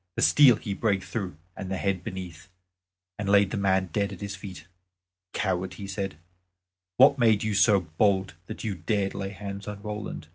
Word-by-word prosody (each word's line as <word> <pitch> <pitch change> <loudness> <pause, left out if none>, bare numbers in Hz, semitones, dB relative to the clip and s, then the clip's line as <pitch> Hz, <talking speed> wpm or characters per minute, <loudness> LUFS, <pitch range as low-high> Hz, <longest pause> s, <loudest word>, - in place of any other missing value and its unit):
The - - 0
steel 135 -5 +7
he 100 -1 -5
brake 100 -2 0
through 95 -9 -5 0.2
and 95 - -6
the 95 - -2
head 95 -2 -1
beneath, 95 -3 -7 0.7
and 100 -1 -2
laid 100 -1 +5
the - - -2
man 95 -2 +1
dead 100 0 0
at 95 - -8
his 100 -1 -4
feet. 95 -1 -9 0.7
"Coward," 95 -2 -2
he 100 - -7
said, 95 -2 -4 0.8
"what 135 +2 +6
made 110 -4 +4
you 110 -1 -1
so 100 -1 +5
bold 95 +4 +1
that 110 - -7
you 110 -3 -1
dared 95 +3 -1
lay 95 -1 -4
hands 100 +1 -7
on 105 -1 -5
Roland? 105 -6 -5
100 Hz, 185 wpm, -27 LUFS, 95-105 Hz, 0.8 s, steel